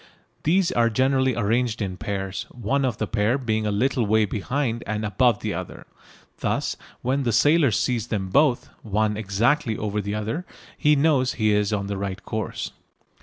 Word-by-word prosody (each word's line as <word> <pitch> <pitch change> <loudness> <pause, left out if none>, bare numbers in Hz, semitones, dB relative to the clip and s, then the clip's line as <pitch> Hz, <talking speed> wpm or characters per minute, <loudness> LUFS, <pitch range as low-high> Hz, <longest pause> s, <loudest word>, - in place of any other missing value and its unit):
These 180 +3 +2
are 115 -1 +3
generally 130 +2 +2
arranged 115 +1 0
in 95 -4 -3
pairs, 95 +2 -4
one 130 +4 -1
of 120 -4 -1
the 110 - -1
pair 110 +4 +1
being 110 -5 -1
a - - 0
little 120 +4 +1
way 110 +1 +3
behind 115 +4 -2
and 110 0 -2
above 105 +2 +2
the 105 - -2
other. 90 +1 -7 0.5
Thus - - -1 0.3
when 135 +3 +1
the 120 -3 0
sailor 145 +6 +4
sees 115 +1 0
them 100 -5 -2
both, 140 +3 +3
one 105 0 0
exactly 110 +5 +1
over 105 0 -2
the 100 +1 -3
other, 110 +11 -3 0.3
he 150 -2 +3
knows 140 -4 +2
he 110 -2 +1
is 105 0 +1
on 100 -2 -1
the 100 0 -3
right 95 0 -4
course. 110 0 -4
110 Hz, 175 wpm, -24 LUFS, 105-130 Hz, 0.5 s, sailor